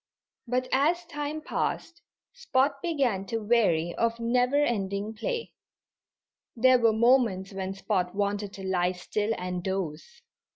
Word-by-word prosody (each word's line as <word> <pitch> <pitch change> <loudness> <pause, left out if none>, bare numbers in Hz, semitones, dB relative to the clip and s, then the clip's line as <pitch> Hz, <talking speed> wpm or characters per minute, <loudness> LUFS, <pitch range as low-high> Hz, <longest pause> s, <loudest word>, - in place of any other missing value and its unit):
But 250 +1 0
as 325 +7 +2
time 295 +1 -4
passed 335 +2 -3 0.3
Spot 280 - 0
began 270 - 0
to 225 - -2
weary 205 -7 +2
of 230 0 0
never 250 +3 +1
ending 210 -6 0
play. 470 - -3 1.0
There 255 +1 +5
were 230 -1 +4
moments 220 -4 +2
when 190 0 -4
Spot 195 -2 -1
wanted 205 0 -1
to 195 - -9
lie 180 -1 +1
still 205 +4 -2
and 180 -1 -4
doze. 190 - -4
225 Hz, 130 wpm, -27 LUFS, 190-265 Hz, 1.0 s, There